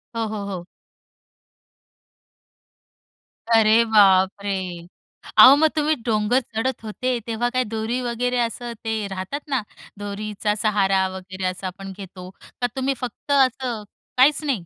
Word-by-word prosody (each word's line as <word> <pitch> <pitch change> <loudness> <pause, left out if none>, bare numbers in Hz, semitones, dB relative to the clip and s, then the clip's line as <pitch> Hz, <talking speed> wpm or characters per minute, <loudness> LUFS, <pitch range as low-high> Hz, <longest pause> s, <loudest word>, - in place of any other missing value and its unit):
हो, 225 -1 -1
हो, 210 -2 -5
हो. 185 -3 -6 2.9
अरे 220 +1 +5
बापरे! 200 -2 +4 0.9
अहो, 265 +2 +10
मग 315 +2 +4
तुम्ही 305 0 +2
डोंगर 220 +2 +2
चढत 235 +1 -3
होते, 245 +3 -2
तेव्हा 235 +2 -1
काय 255 0 0
दोरी 225 +3 -3
वगैरे 245 +1 -1
असं 235 0 -2
ते 220 -2 -2
राहतात 190 +8 -5
ना, 265 -3 +1 0.4
दोरीचा 210 +1 -3
सहारा 195 -3 +2
वगैरे 190 0 -7
असा 185 +1 -5
आपण 195 +1 -8
घेतो? 185 -2 -10 0.3
का 245 - +2
तुम्ही 265 +1 0
फक्त 250 +4 -6
असं 255 -4 +1 0.3
काहीच 285 +4 +4
नाही? 255 - -2
220 Hz, 125 wpm, -22 LUFS, 200-250 Hz, 2.9 s, अहो